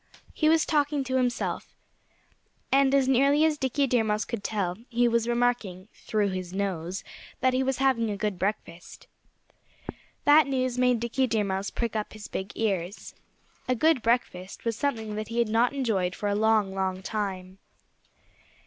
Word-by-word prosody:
He 310 - +2
was 320 0 +4
talking 290 -2 +1
to 260 0 -1
himself. 250 -1 -2 1.0
And 275 0 +4
as 270 -2 +3
nearly 275 +4 +4
as 305 -2 +1
Dickie 265 +2 +1
Deer 245 -3 +2
Mouse 215 0 -1
could 230 -4 -5
tell, 190 -5 -2
he 240 0 +2
was 235 0 +1
remarking 235 -6 -1
through 210 -2 -1
his 185 -1 -5
nose 190 -2 -3 0.4
that 255 0 +2
he 255 - +1
was 265 -1 0
having 260 -4 +2
a 205 - -3
good 205 -3 -2
breakfast. 185 -3 -4 1.2
That 295 0 +6
news 255 -2 -1
made 250 -2 +3
Dickie 255 +3 0
Deer 220 -3 +1
Mouse 195 0 -2
prick 230 -2 -3
up 215 -1 -3
his 215 -1 -9
big 190 +1 -5
ears. 195 -3 -2 0.5
A 255 - +2
good 310 +1 +3
breakfast 225 -6 -1
was 230 -1 0
something 225 -5 -2
that 215 0 -4
he 230 - -5
had 235 -2 +2
not 230 +3 +3
enjoyed 215 -10 -1
for 205 - -3
a - - +1
long, 215 -2 +2
long 190 -1 -2
time. 190 -3 -4
225 Hz, 170 wpm, -27 LUFS, 200-260 Hz, 1.2 s, That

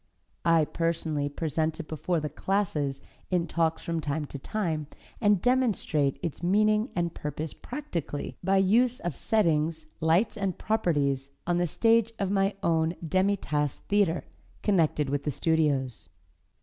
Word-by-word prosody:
I 165 -2 +5
personally 160 -3 -1
present 160 +1 -1
it 165 - -6
before 165 +2 -1
the 150 - -3
classes 150 -4 -1 0.3
in 180 -2 +1
talks 165 -1 0
from 165 -1 -2
time 150 0 -2
to 140 - -5
time, 160 -4 -2 0.3
and 205 -3 +4
demonstrate 220 - +2
its 165 -3 -4
meaning 215 +5 +3
and 170 -1 0
purpose 150 +1 -4
practically, 180 - -5
by 195 +2 +3
use 230 +6 +3
of 175 -5 -3
settings, 160 - +1
lights 170 +8 +2
and 195 -3 -1
properties 145 -11 0 0.2
on 175 0 +1
the 175 - +2
stage 230 +5 +3
of 195 -2 -1
my 195 0 +2
own 165 0 +2
Demi 190 +5 +2
Tasse 150 -5 -2
theatre, 200 -5 +2 0.4
connected 160 -7 +2
with 140 +1 -1
the - - -1
studios. 145 -5 0
165 Hz, 145 wpm, -28 LUFS, 150-200 Hz, 0.4 s, I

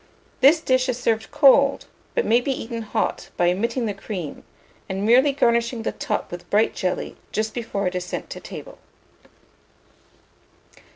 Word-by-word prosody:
This 300 +5 +6
dish 255 -3 +2
is 245 - 0
served 225 -3 0
cold, 280 -1 +5 0.3
but 485 - +1
may 235 +2 +4
be 275 - -1
eaten 230 -2 -4
hot, 215 - -2
by 175 0 +3
omitting 230 +6 -1
the 210 - -1
cream, 195 -5 -6 0.5
and 195 +1 -2
merely 255 +6 +5
garnishing 235 -3 +1
the - - -1
top 210 - -3
with 175 0 -8
bright 215 +2 +3
jelly 185 -3 -3
just 215 0 -2
before 220 -4 -3
it 180 - 0
is 180 -1 -2
sent 180 - -5
to - - -6
table. - - -10
230 Hz, 160 wpm, -23 LUFS, 200-260 Hz, 0.5 s, This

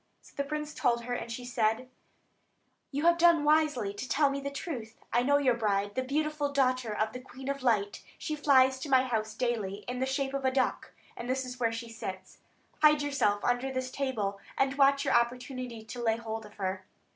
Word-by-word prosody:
So - - -18
the 280 - 0
prince 300 +1 -4
told 235 -1 +1
her, 245 +1 -3
and 235 -1 -4
she 245 +1 -5
said: 235 0 0 1.0
"You 290 +3 -2
have 340 0 +5
done 340 -3 +6
wisely 295 -9 +2
to 230 +6 -6
tell 285 -2 +3
me 280 - -2
the 280 - -3
truth. 255 -6 -6 0.2
I 240 - +4
know 285 +3 +4
your 270 -3 +3
bride, 205 -3 0
the 260 - 0
beautiful 295 +2 -1
daughter 255 -4 +1
of 215 +1 -1
the 250 - -5
Queen 260 +1 -11
of 280 0 -2
Light; 210 -5 +1 0.2
she 310 -2 -3
flies 265 -3 +4
to 285 - -6
my 260 -1 +5
house 220 -4 -2
daily, 215 -5 -2
in 250 0 -3
the 260 - 0
shape 270 0 -1
of 275 -1 -2
a 260 - +4
duck, 260 0 0 0.2
and 240 - -6
this 260 0 0
is 250 0 -8
where 230 -2 +2
she 230 +1 -5
sits. 190 -5 -7 0.4
Hide 300 -1 +6
yourself 210 -8 +1
under 245 +2 +1
the 260 0 -1
table, 255 -7 -2 0.2
and 270 0 +2
watch 275 0 +4
your - - +2
opportunity 245 -1 -1
to 240 +2 -7
lay 225 -1 +2
hold 225 -1 -5
of 210 - -18
her. 190 -1 -3
255 Hz, 215 wpm, -30 LUFS, 230-275 Hz, 1.0 s, done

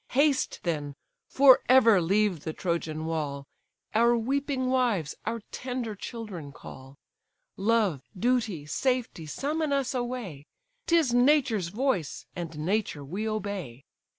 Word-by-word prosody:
Haste, 280 +1 +2
then, 150 -5 -2 0.3
for 265 -2 +6
ever 230 -7 +6
leave 195 +1 +2
the 160 - -4
Trojan 160 -3 -2
wall! 145 -4 -3 0.5
Our 235 +2 +4
weeping 270 +2 -1
wives, 240 - +1
our 230 0 -2
tender 250 -3 -4
children 200 - -7
call: 135 0 -12 0.6
Love, 205 - +1 0.2
duty, 225 -8 0
safety, 245 - -1
summon 300 - -2
us 275 -2 0
away, 240 - -4 0.4
'Tis 325 -7 +3
nature's 245 - +3
voice, 205 - -1
and 170 -3 -6
nature 165 -3 -1
we 200 +9 -3
obey. 195 - -5
215 Hz, 120 wpm, -28 LUFS, 165-255 Hz, 0.6 s, for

